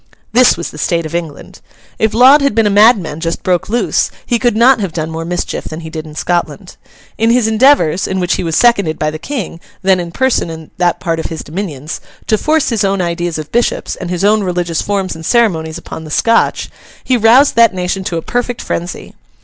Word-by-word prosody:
This 250 -4 +5
was 170 - -5
the 150 - -10
state 170 0 0
of 155 - -7
England. 165 -4 -6 0.4
If 220 0 +1
Laud 265 +5 +7
had 280 -6 +1
been 225 -1 +3
a 205 - +2
madman 205 -7 +3
just 165 0 -3
broke 180 0 0
loose, 240 +3 0 0.2
he 240 -2 0
could 240 -3 +1
not 250 +2 +5
have 195 -6 -3
done 160 -1 -3
more 165 0 -5
mischief 175 +1 -3
than 160 +1 -7
he 160 -1 -9
did 155 -1 -6
in 150 - -12
Scotland. 175 +2 -3 0.4
In 225 +1 +2
his 235 -1 +3
endeavours 220 - +3
(in 190 - -2
which 180 -1 0
he - - -2
was 165 -2 -2
seconded 200 -9 +3
by 155 0 -1
the 155 - -7
King, 220 - -5 0.2
then 190 -1 +3
in 170 -1 -5
person 260 -4 0
in 160 -1 -9
that 175 -1 +1
part 165 -1 -2
of - - -3
his 165 - -6
dominions) 155 -4 -6 0.2
to 215 - +1
force 310 -1 +1
his 225 -5 0
own 195 0 0
ideas 175 -1 -2
of 155 -1 -7
bishops, 240 +1 -1
and 175 - -7
his 180 +1 -2
own 215 +1 +3
religious 175 -3 -1
forms 195 -2 -2
and 160 - -10
ceremonies 165 -7 +1
upon 160 - -9
the 155 - -10
Scotch, 230 +9 +1 0.3
he 255 - +1
roused 240 +5 +4
that 230 -1 +5
nation 180 +1 -2
to 170 - -2
a 165 - -4
perfect 245 0 -2
frenzy. 175 +1 -5
180 Hz, 220 wpm, -14 LUFS, 165-230 Hz, 0.4 s, Laud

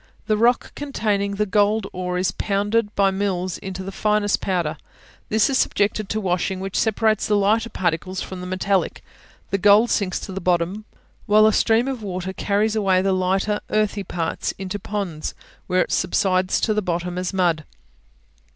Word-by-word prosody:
The 215 - +2
rock 235 +3 +2
containing 210 -8 -1
the 210 +1 +1
gold 210 +1 +2
ore 180 0 -3
is 180 +1 +1
pounded 205 +2 0
by 195 -1 +3
mills 185 -2 -2
into 190 0 -6
the 195 - -6
finest 210 +1 +1
powder; 170 -5 -1 0.5
this 215 -1 +3
is 270 -2 +1
subjected 205 0 0
to 215 - -1
washing, 185 -1 -1
which 195 0 -5
separates 220 -1 +1
the 210 - +3
lighter 215 +3 +2
particles 185 0 -2
from 185 -1 -6
the 180 - -6
metallic; 185 +1 -1 0.5
the 195 - +1
gold 205 +4 +5
sinks 195 -3 0
to - - -7
the 195 +1 -5
bottom, 180 +4 0 0.4
while 215 0 +6
a 215 - +4
stream 230 +4 +3
of 265 -4 -3
water 190 -2 -4
carries 210 +3 0
away 190 -3 +2
the 195 0 +2
lighter 190 +3 0
earthy 215 -1 0
parts 165 -3 -3
into 195 +1 -4
ponds, 190 -6 -4 0.3
where 185 0 +3
it - - -9
subsides 185 -2 +1
to 215 - +2
the 210 - 0
bottom 180 -1 -2
as 180 -1 -2
mud. 175 -5 +1
195 Hz, 175 wpm, -22 LUFS, 185-210 Hz, 0.5 s, while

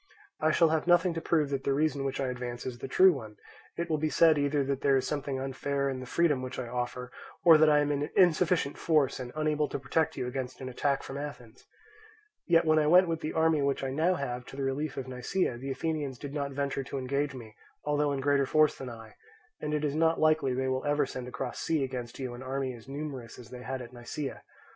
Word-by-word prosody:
I 155 - +2
shall 165 +1 +4
have 160 +1 0
nothing 175 0 +4
to 165 - -4
prove 155 -4 +1
that 135 -1 -2
the 140 - +1
reason 145 -1 +1
which 135 -1 -2
I 135 -2 0
advance 120 -1 -5
is 125 -2 -5
the 135 - -5
true 185 +7 +6
one; 110 -7 -8 0.4
it 170 - -2
will 155 -2 0
be 155 +1 0
said 160 0 +5
either 145 0 +1
that 135 0 -2
there 140 -1 +4
is 130 - -1
something 140 -1 -2
unfair 140 +1 -1
in 130 - -4
the 130 - -8
freedom 150 -3 +2
which 130 0 -6
I 130 - -4
offer, 125 +1 -4 0.3
or 165 -3 +8
that 155 0 +6
I 150 -1 +5
am 145 0 0
in 145 0 -1
insufficient 175 -4 +3
force 150 -6 +2
and 125 -1 -6
unable 155 -1 +1
to - - -3
protect 160 +4 0
you - - -2
against 125 0 -4
an 130 - -5
attack 140 +2 0
from 135 +1 -6
Athens. 125 -5 -9 0.8
Yet 165 -1 +4
when 155 0 +4
I 150 - +2
went 180 +2 +6
with 165 -1 -1
the 155 -1 -4
army 160 -2 +3
which 140 -1 0
I 135 - -2
now 165 +6 +2
have 125 -5 -4
to - - -10
the 140 - -3
relief 135 +2 -2
of 130 - -4
Nisaea, 125 +1 -1
the 135 +2 -5
Athenians 145 -1 -2
did 140 +2 -7
not 140 -2 -2
venture 140 0 -2
to 140 - -5
engage 140 +2 -1
me 110 -4 -10 0.3
although 150 0 +1
in 140 -1 -2
greater 140 0 +2
force 155 0 +4
than 130 - -7
I; 115 -2 -11 0.4
and 150 - -3
it 150 0 0
is 145 - -1
not 160 +1 +2
likely 155 -4 +3
they 130 +1 -1
will 130 0 -1
ever 145 0 +2
send 130 -1 -6
across 125 - -5
sea 160 -4 0
against 125 -3 -5
you 130 -2 -4
an 120 - -9
army 130 0 -3
as 120 +1 -13
numerous 135 -5 -6
as 120 - -12
they 125 -1 -8
had 130 +1 -4
at 120 +1 -12
Nisaea. 125 +3 -6
140 Hz, 245 wpm, -29 LUFS, 130-155 Hz, 0.8 s, or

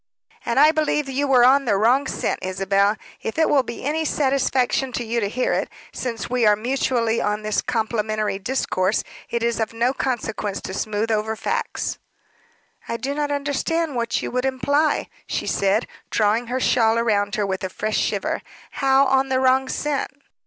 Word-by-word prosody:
"And 235 - +1
I 300 +2 +7
believe 305 -2 0
you 275 +2 -1
were 250 -3 +6
on 275 +2 +5
the 205 -4 +2
wrong 250 +7 +3
scent, - - -2
Isabel 195 +2 +1 0.2
if 225 - -4
it 320 - +4
will 285 - +4
be 235 -2 -7
any 305 +4 0
satisfaction 265 -3 +1
to 240 - -2
you 235 +1 -1
to 200 -3 -1
hear 250 +4 0
it. - - -1 0.2
Since 230 -5 -4
we 250 -1 0
are 210 -1 +6
mutually 235 0 0
on 210 +1 -1
this 215 -1 0
complimentary 215 -3 -1
discourse, 195 -3 0 0.3
it 235 -1 -1
is 235 0 0
of 225 0 -1
no 235 +3 +1
consequence 220 -6 -2
to 190 - -6
smooth 215 +2 -1
over 220 +1 0
facts." - - -3 0.9
"I 230 - -2
do 275 +3 -3
not 295 0 -1
understand 290 +2 -1
what 235 0 -1
you - - -3
would 250 +1 -1
imply," 285 +4 +1 0.2
she - - -2
said, 200 +3 +1 0.2
drawing 220 +2 +1
her 255 +2 -1
shawl 225 -3 +3
round 205 -3 +1
her 210 - 0
with 190 -1 -3
a 190 - -2
fresh 215 +3 -2
shiver. - - -1 0.3
"How 270 0 +3
on 265 0 +2
the 260 0 +2
wrong 260 0 +3
scent?" 295 -2 -1
235 Hz, 180 wpm, -22 LUFS, 215-270 Hz, 0.9 s, I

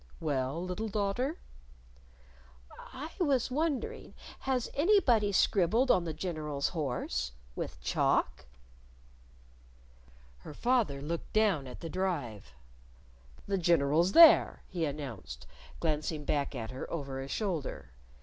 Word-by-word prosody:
"Well, 135 +1 -1
little 185 +5 -3
daughter?" 215 - -1 1.5
"I 295 +5 -7
was 275 -8 +1
wondering 320 - -2 0.2
has 260 -3 -1
anybody 280 - +3
scribbled 215 +6 +3
on 180 - +2
the 165 - -2
General's 155 -4 -2
horse? 125 - -3 0.2
with - - -5
chalk?" 65 -2 0 1.9
Her 105 - -10
father 225 - +1
looked 165 +3 -5
down 200 -11 +2
at 125 - -10
the 165 - -5
Drive. 145 - -3 0.9
"The 195 -1 -1
General's 170 +1 +3
there!" 335 -1 +7
he 170 -3 -2
announced, 140 -8 -6 0.3
glancing 155 -1 -2
back 140 -1 -1
at 115 -2 -5
her 130 - -7
over 135 -4 -4
a 135 - -6
shoulder. 150 - -3
170 Hz, 110 wpm, -31 LUFS, 140-220 Hz, 1.9 s, there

